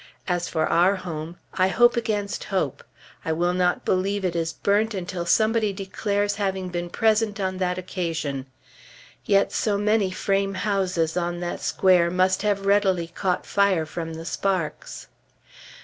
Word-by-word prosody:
As 175 Hz, -2 st, 0 dB
for 160 Hz, -2 st, 0 dB
our 180 Hz, +4 st, +3 dB
home, 170 Hz, -2 st, -6 dB, 0.2 s
I 185 Hz, 0 st, +3 dB
hope 240 Hz, +5 st, +4 dB
against 210 Hz, -3 st, -2 dB
hope. 145 Hz, -9 st, -2 dB, 0.4 s
I 160 Hz, -, -2 dB
will 175 Hz, +2 st, +1 dB
not 180 Hz, -1 st, +1 dB
believe 195 Hz, +1 st, 0 dB
it 175 Hz, -2 st, -1 dB
is 165 Hz, -1 st, -1 dB
burnt, 205 Hz, +5 st, +1 dB
until 175 Hz, -2 st, -4 dB
somebody 220 Hz, +2 st, +3 dB
declares 205 Hz, +1 st, -2 dB
having 190 Hz, -2 st, -2 dB
been 175 Hz, 0 st, -4 dB
present 220 Hz, 0 st, +1 dB
on 185 Hz, -1 st, -2 dB
that 180 Hz, -1 st, 0 dB
occasion. 165 Hz, -7 st, -3 dB, 0.8 s
Yet 200 Hz, -1 st, +3 dB
so 205 Hz, -2 st, +1 dB
many 210 Hz, -1 st, +2 dB
frame 195 Hz, +1 st, 0 dB
houses 185 Hz, -5 st, 0 dB
on 175 Hz, 0 st, -1 dB
that 175 Hz, -, -4 dB
square 180 Hz, -2 st, +3 dB
must 185 Hz, +1 st, +2 dB
have 200 Hz, -1 st, 0 dB
readily 195 Hz, -4 st, +2 dB
caught 180 Hz, +1 st, -1 dB
fire 200 Hz, -5 st, +2 dB
from 165 Hz, 0 st, -5 dB
the 165 Hz, +1 st, -8 dB
sparks. 185 Hz, -3 st, -2 dB
185 Hz, 150 wpm, -24 LUFS, 175-200 Hz, 0.8 s, hope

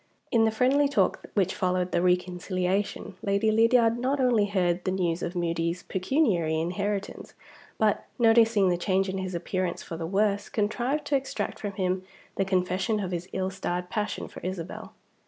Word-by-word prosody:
In 225 Hz, -1 st, +4 dB
the -, -, +4 dB
friendly 265 Hz, +6 st, +3 dB
talk 285 Hz, -, +1 dB
which 190 Hz, -3 st, +2 dB
followed 180 Hz, -1 st, 0 dB
the -, -, +1 dB
reconciliation, 180 Hz, +2 st, -1 dB
Lady 200 Hz, +2 st, +1 dB
Lydiard 230 Hz, +1 st, +4 dB
not 265 Hz, +3 st, 0 dB
only 240 Hz, -5 st, +3 dB
heard 180 Hz, -3 st, 0 dB
the -, -, -1 dB
news 180 Hz, -2 st, 0 dB
of 175 Hz, -, -4 dB
Moody's 170 Hz, 0 st, -1 dB
pecuniary 185 Hz, -, +1 dB
inheritance 195 Hz, +4 st, -3 dB, 0.4 s
but, 215 Hz, -2 st, +1 dB
noticing 225 Hz, -4 st, +5 dB
the 175 Hz, -, +1 dB
change 190 Hz, +1 st, +1 dB
in 190 Hz, 0 st, -3 dB
his 185 Hz, -1 st, -4 dB
appearance 180 Hz, +1 st, -2 dB
for 165 Hz, -, -6 dB
the 165 Hz, 0 st, -4 dB
worse, 200 Hz, +2 st, +1 dB
contrived 240 Hz, +7 st, -1 dB
to 290 Hz, -, +1 dB
extract 270 Hz, 0 st, -2 dB
from 205 Hz, -1 st, -4 dB
him 185 Hz, -1 st, -1 dB, 0.3 s
the 195 Hz, -, +1 dB
confession 190 Hz, +3 st, 0 dB
of 190 Hz, -3 st, -3 dB
his 180 Hz, +1 st, -4 dB
ill 190 Hz, 0 st, -2 dB
starred 180 Hz, -2 st, -3 dB
passion 210 Hz, -1 st, -2 dB
for -, -, -10 dB
Isabel. 180 Hz, -1 st, -6 dB
190 Hz, 170 wpm, -27 LUFS, 180-220 Hz, 0.4 s, noticing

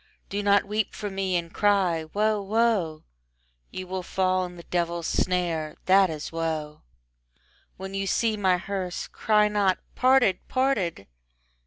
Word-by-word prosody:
Do 200 Hz, +1 st, -2 dB
not 200 Hz, 0 st, +3 dB
weep 210 Hz, 0 st, -2 dB
for 205 Hz, -2 st, -5 dB
me 190 Hz, -1 st, -1 dB
and 170 Hz, -1 st, -2 dB
cry 190 Hz, -6 st, +2 dB
"Woe, 210 Hz, +5 st, 0 dB
woe!" 200 Hz, -6 st, 0 dB, 0.7 s
You 185 Hz, -, -6 dB
will 185 Hz, 0 st, -4 dB
fall 185 Hz, 0 st, 0 dB
in 180 Hz, 0 st, -9 dB
the 170 Hz, -, -11 dB
devil's 170 Hz, -1 st, -2 dB
snare: 170 Hz, -5 st, -1 dB
that 190 Hz, 0 st, +5 dB
is 155 Hz, -2 st, -5 dB
woe. 160 Hz, -2 st, -3 dB, 1.0 s
When 190 Hz, +1 st, -7 dB
you 195 Hz, 0 st, -2 dB
see 225 Hz, +3 st, +1 dB
my 190 Hz, -3 st, +2 dB
hearse, 185 Hz, -1 st, -4 dB
cry 210 Hz, -1 st, +2 dB
not 205 Hz, -3 st, +2 dB, 0.2 s
"Parted, 255 Hz, -7 st, +4 dB
parted!" 225 Hz, -, 0 dB
190 Hz, 145 wpm, -26 LUFS, 170-205 Hz, 1.0 s, that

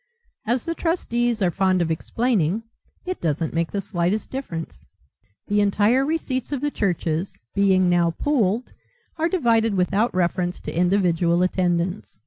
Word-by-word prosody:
As 240 Hz, +2 st, 0 dB
the 335 Hz, -, -1 dB
trustees 240 Hz, -, 0 dB
are 175 Hz, -, +2 dB
fond 190 Hz, 0 st, +2 dB
of 165 Hz, -2 st, 0 dB
explaining 210 Hz, +2 st, 0 dB, 0.4 s
it 370 Hz, 0 st, -4 dB
doesn't 160 Hz, 0 st, -1 dB
make 165 Hz, 0 st, 0 dB
the 200 Hz, -, -2 dB
slightest 190 Hz, +2 st, -1 dB
difference. 180 Hz, -12 st, -6 dB, 0.6 s
The 205 Hz, 0 st, +1 dB
entire 205 Hz, +6 st, +3 dB
receipts 275 Hz, -4 st, -2 dB
of 285 Hz, -, -1 dB
the 290 Hz, +2 st, -1 dB
churches, 175 Hz, -, -1 dB, 0.2 s
being 190 Hz, -2 st, +3 dB
now 175 Hz, -1 st, +3 dB
pooled, 240 Hz, -5 st, 0 dB, 0.4 s
are 330 Hz, +1 st, +1 dB
divided 230 Hz, -, +2 dB
without 195 Hz, +5 st, +1 dB
reference 180 Hz, 0 st, 0 dB
to -, -, -6 dB
individual 175 Hz, -1 st, +2 dB
attendance. 180 Hz, -, -1 dB
195 Hz, 140 wpm, -23 LUFS, 175-240 Hz, 0.6 s, entire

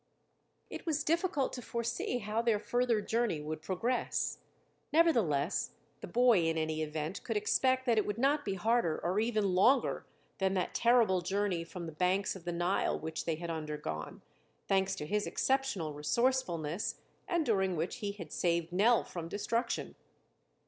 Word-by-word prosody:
It -, -, -7 dB
was 310 Hz, -2 st, 0 dB
difficult 330 Hz, -4 st, 0 dB
to 250 Hz, -, -5 dB
foresee 235 Hz, +1 st, -2 dB
how 215 Hz, 0 st, -1 dB
their 230 Hz, -2 st, +2 dB
further 240 Hz, 0 st, +1 dB
journey 225 Hz, -6 st, 0 dB
would 155 Hz, +1 st, -5 dB
progress; 195 Hz, +10 st, -1 dB, 0.5 s
nevertheless, 235 Hz, -, +2 dB, 0.3 s
the -, -, -7 dB
boy 240 Hz, +1 st, +4 dB
in 165 Hz, 0 st, +1 dB
any 155 Hz, 0 st, -1 dB
event 155 Hz, +3 st, -4 dB
could 225 Hz, -3 st, -1 dB
expect 260 Hz, +5 st, +2 dB
that 235 Hz, -3 st, +3 dB
it 210 Hz, -, 0 dB
would 205 Hz, 0 st, -2 dB
not 285 Hz, +4 st, +2 dB
be 195 Hz, -, -2 dB
harder 215 Hz, -4 st, +1 dB
or 180 Hz, +4 st, +1 dB
even 215 Hz, -4 st, +1 dB
longer 240 Hz, +9 st, +3 dB, 0.3 s
than 190 Hz, 0 st, +1 dB
that 185 Hz, -, -1 dB
terrible 230 Hz, -6 st, +4 dB
journey 190 Hz, -1 st, -1 dB
from 170 Hz, +1 st, -7 dB
the 160 Hz, -, -6 dB
banks 180 Hz, +6 st, +1 dB
of 180 Hz, -3 st, -11 dB
the 175 Hz, -, -1 dB
Nile 175 Hz, +3 st, 0 dB
which 160 Hz, 0 st, -4 dB
they 165 Hz, -, 0 dB
had 170 Hz, +1 st, -5 dB
undergone, 150 Hz, -, -5 dB, 0.4 s
thanks 195 Hz, 0 st, +2 dB
to 150 Hz, -, -5 dB
his 210 Hz, +5 st, -1 dB
exceptional 265 Hz, -, 0 dB
resourcefulness, 170 Hz, -, 0 dB, 0.3 s
and 340 Hz, -3 st, +1 dB
during 190 Hz, -6 st, +1 dB
which 165 Hz, +2 st, -2 dB
he 205 Hz, -4 st, -3 dB
had 170 Hz, -7 st, -9 dB
saved 170 Hz, -1 st, 0 dB
Nell 220 Hz, +5 st, +4 dB
from 170 Hz, -2 st, -6 dB
destruction. 230 Hz, +4 st, -2 dB
200 Hz, 165 wpm, -32 LUFS, 170-240 Hz, 0.5 s, boy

